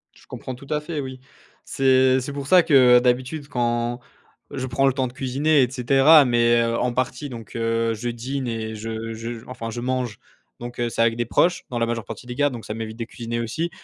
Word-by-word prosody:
Je - - -20
comprends 130 - -7
tout 135 +2 -14
à 150 0 0
fait, 150 0 -5
oui. 130 -1 -6 0.5
C'est 130 -1 +3
c'est 130 +2 -5
pour 140 -1 -5
ça 180 +2 +6
que 125 -4 +6
d'habitude 130 +4 -1
quand 120 -1 -1 0.5
je 130 -1 -4
prends 130 +2 +1
le 135 - +3
temps 130 -1 -1
de 120 - -11
cuisiner 140 +3 +2
et 125 - 0
cetera, 135 +4 +5
mais, 120 -1 +3
heu, 115 0 0
en 125 -1 0
partie 130 +3 -2
donc 115 -3 -10
heu, 115 0 0
je 115 +2 -4
dîne 130 +3 -4
et 110 -1 -4
je 115 +1 -5
je 115 +1 -6
enfin 115 -3 -6
je 115 - -5
mange, 125 -3 -2 0.4
donc 120 0 -6
c'est 115 - -2
avec 115 0 +3
des 120 0 -1
proches, 175 +9 +1
dans 120 - -4
la 115 - +1
majeure 115 -1 -3
partie - - -8
des 125 - -6
cas, 145 +1 +2
donc 120 -4 -8
ça 105 - -4
m'évite 110 0 -6
de 115 - -4
cuisiner 115 0 -5
aussi. 125 +9 -2
125 Hz, 225 wpm, -23 LUFS, 115-135 Hz, 0.5 s, ça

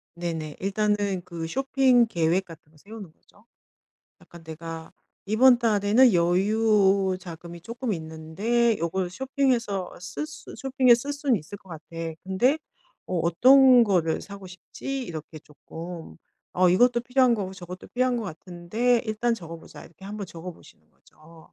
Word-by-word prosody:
네 175 0 -3
네. 155 -2 -6
일단은 205 -1 0
그 165 -2 -6
쇼핑 265 +2 +3
계획 175 -2 0
같은 160 -2 -15
거 155 - -23
세우는 200 +1 -11
거죠. 205 +6 -27 0.8
약간 170 -1 -15
'내가 160 0 -8 0.4
이번 245 +4 +5
달에는 220 +1 +4
여유 195 +1 +2
자금이 170 -1 -10
쪼끔 230 +5 -4
있는데 185 +8 -1
요걸 175 +2 -2
쇼핑해서 240 -5 -1
쓸 180 +12 -5
수 310 - -11
쇼핑에 260 -2 +4
쓸 275 +5 -3
순 280 -4 +1
있을 200 +3 -9
것 190 - -22
같아. 160 -2 -10 0.4
근데 240 +11 +2 0.5
어 180 - -2
어떤 250 +9 +6
거를 175 -6 0
사고 200 -1 -10
싶지?' 265 +9 -6
이렇게 155 -4 -8
쪼끔 165 +3 -10 0.4
'어 180 0 +4
이것도 240 +6 +4
필요한 250 0 +3
거고 195 -4 -4
저것도 180 -1 -10
필요한 250 0 0
거 235 - -3
같은데 190 +8 -1
일단 230 +2 0
적어 165 -6 -9
보자.' - - -13
이렇게 180 +4 -14
한 210 - -6
번 205 - -5
적어 170 +1 -8
보시는 170 - -18
거죠. 160 +1 -20
195 Hz, 300 characters per minute, -25 LUFS, 170-235 Hz, 0.8 s, 어떤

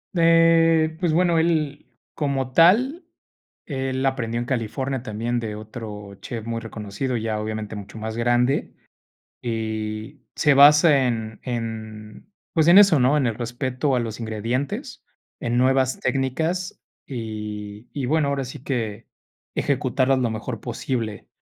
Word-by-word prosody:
Eh, 165 -1 +4
pues 175 -4 +1
bueno, 170 0 +3
él 155 -3 0 0.3
como 135 -3 -1
tal, 240 - +4 0.6
él 135 -2 -2
aprendió 120 -3 -1
en 120 - -3
California 130 +2 -2
también 120 +1 -2
de 110 -2 -4
otro 105 -2 -8
chef 115 -3 -6
muy 115 0 -3
reconocido, 115 +3 -4
ya 110 -1 -2
obviamente 110 0 -4
mucho 105 +2 -9
más 110 0 -5
grande. 120 +3 +1 0.7
Y 110 +2 -4
se 150 -2 +4
basa 145 -1 +7
en 110 -2 -3
en, 110 - -6 0.2
pues, 160 -1 +3
en 175 +3 +8
eso, 195 -8 +7
¿no?, 130 +4 +4
en 140 - +1
el 115 - +1
respeto 125 +3 -1
a - - +2
los 115 -1 -4
ingredientes, 115 +5 -3 0.4
en 120 +1 -1
nuevas 130 0 +2
técnicas, 160 +8 -1 0.3
y 105 -3 -6
y, 140 -3 -2
bueno, 155 +2 +2
ahora 140 -2 -1
sí 125 - -8
que 115 -5 -3 0.5
ejecutarlas 135 -1 +1
lo 120 - +1
mejor 110 +1 -5
posible. 115 -3 -4
125 Hz, 135 wpm, -23 LUFS, 110-145 Hz, 0.7 s, en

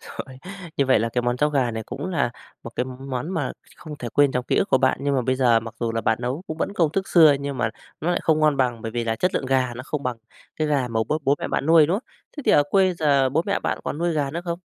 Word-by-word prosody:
Rồi. 130 -1 -9 0.4
Như 140 - +2
vậy 130 - +4
là 115 +1 0
cái 120 +1 -1
món 120 0 0
cháo 150 +3 +2
gà 135 -5 +1
này 110 -1 -4
cũng 135 +7 -5
là 165 -9 0 0.3
một 115 - -8
cái 125 - +1
món 130 +3 -5
mà 160 -8 -2 0.2
không 150 -2 -9
thể 120 - -5
quên 145 +3 +3
trong 125 0 -1
ký - - 0
ức - - +2
của 130 - +4
bạn. 130 -1 +2
Nhưng 140 -1 +1
mà 130 - +1
bây 130 +1 0
giờ 120 -3 +4
mặc 115 -1 -9
dù 115 -1 -1
là 115 - -1
bạn 110 0 +1
nấu 125 +8 -3
cũng 160 - -5
vẫn - - -1
công 160 -3 +2
thức 195 0 -2
xưa 160 -4 +7
nhưng 140 -2 -4
mà 110 -3 0 0.3
nó 175 - 0
lại 175 - 0
không 155 -1 +2
ngon 150 -2 +3
bằng, 120 -4 0
bởi 115 - -4
vì 120 -1 -2
là 115 0 -1
chất 180 - 0
lượng 130 - -1
gà 130 -2 +1
nó 125 - -6
không 145 -1 -4
bằng 125 -2 -2 0.4
cái 155 -1 -1
gà 140 -4 +1
mà 110 -1 -1
bố 155 - +1
bố 140 +1 +3
mẹ - - -4
bạn 140 - -1
nuôi, 160 -2 +6
đúng 170 - +1
không? 235 - -7 0.3
Thế 290 - -5
thì - - +5
ở 145 - +6
quê 190 -2 +3
giờ 140 -5 +3
bố 160 +5 +1
mẹ 200 - 0
bạn - - -2
còn 150 - -3
nuôi 170 0 0
gà 145 -3 -1
nữa 170 +3 -4
không? 170 -1 -3
135 Hz, 310 wpm, -23 LUFS, 125-155 Hz, 0.4 s, xưa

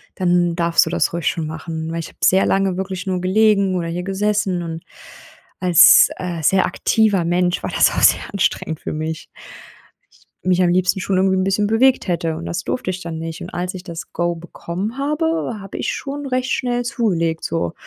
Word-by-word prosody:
dann 175 -2 +1
darfst 170 0 +3
du - - -4
das 170 -2 0
ruhig 170 -1 -2
schon 160 -2 -1
machen.“ 160 0 -5
Weil 165 - -3
ich 165 - -5
habe - - -18
sehr 190 +1 +4
lange 195 -2 +1
wirklich 190 0 -5
nur 185 -1 -1
gelegen 200 +1 +2
oder 170 -2 -2
hier 175 +2 -4
gesessen 195 -1 -1
und 165 -1 -6 0.8
als, 180 -1 +7
äh, 175 -2 -4
sehr 190 +4 +3
aktiver 205 -6 +1
Mensch 175 +1 +1
war - - -3
das - - +3
auch - - -2
sehr - - +5
anstrengend 165 -4 -1
für - - -5
mich. 155 +1 -4 1.2
Mich 185 0 +2
am 175 - +3
liebsten 185 +2 +1
schon 190 0 -1
irgendwie 190 0 +2
'n 185 - +1
bisschen 195 +2 +1
bewegt 250 +4 +3
hätte 165 -2 -1
und 165 +1 -7
das 175 +2 -3
durfte 250 -3 -3
ich 185 0 -4
dann 165 -1 -5
nicht. 165 +2 -6
Und 175 - -7
als 180 +2 -3
ich 180 - -8
das 165 -6 -8
Go 175 +1 -1
bekommen 175 +6 -6
habe, 300 -3 -1
habe 195 0 -8
ich - - -2
schon 285 +1 -6
recht 255 -1 -1
schnell 245 -1 -1
zugelegt. 175 -9 -1
So 125 - -2
180 Hz, 200 wpm, -19 LUFS, 170-200 Hz, 1.2 s, als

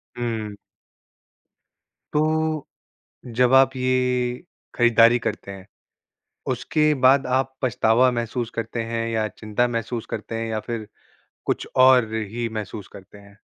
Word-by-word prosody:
हुँ। 110 -4 -4 1.6
तो, 155 0 0 0.6
जब 125 +1 +1
आप 135 0 +5
ये 125 +1 0 0.3
खरीदारी 120 0 +5
करते 100 - -4
हैं, 95 -1 -11 0.8
उसके 155 0 +1
बाद 135 +2 +5
आप 135 0 -2
पछतावा 125 0 +3
महसूस 120 0 -3
करते 115 +1 -3
हैं 115 0 -1
या 110 -1 0
चिंता 110 +3 -1
महसूस 115 -1 -3
करते 115 +1 -5
हैं 115 0 -3
या 110 -1 -2
फिर 115 -3 -4 0.6
कुछ - - -2
और 130 -3 +5
ही 110 +2 -3
महसूस 105 -2 -6
करते 100 +1 -13
हैं? 100 0 -18
120 Hz, 125 wpm, -23 LUFS, 110-130 Hz, 1.6 s, आप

